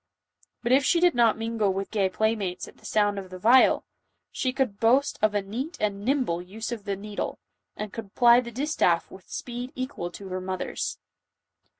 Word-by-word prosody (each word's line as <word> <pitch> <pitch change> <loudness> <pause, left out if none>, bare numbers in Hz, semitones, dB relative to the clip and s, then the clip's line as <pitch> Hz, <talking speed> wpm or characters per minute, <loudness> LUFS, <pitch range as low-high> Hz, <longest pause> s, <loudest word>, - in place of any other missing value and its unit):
But 235 - 0
if 270 +2 +5
she 340 - +3
did 355 0 +4
not 235 -3 +4
mingle 225 -3 0
with 195 +1 -4
gay 200 -3 +1
playmates 205 -3 -1
at - - -15
the - - -11
sound 205 -1 +2
of 190 -1 -9
the 185 - -8
viol, 235 +7 +5 0.5
she 255 - -1
could 255 -6 -1
boast 255 +5 +3
of 215 -1 +3
a 205 - +1
neat 260 - -5
and 200 -1 -1
nimble 250 -9 +1
use 215 +6 -6
of 220 -4 -5
the 200 -1 -1
needle, 205 +1 -5 0.4
and 210 -1 -5
could 215 -3 -8
ply 240 0 +7
the 235 - -7
distaff 235 - +1
with 190 -1 -14
speed 245 +1 -5
equal 255 -9 -4
to 190 +2 -10
her 185 0 -3
mother's. 185 0 -3
215 Hz, 195 wpm, -26 LUFS, 195-245 Hz, 0.5 s, ply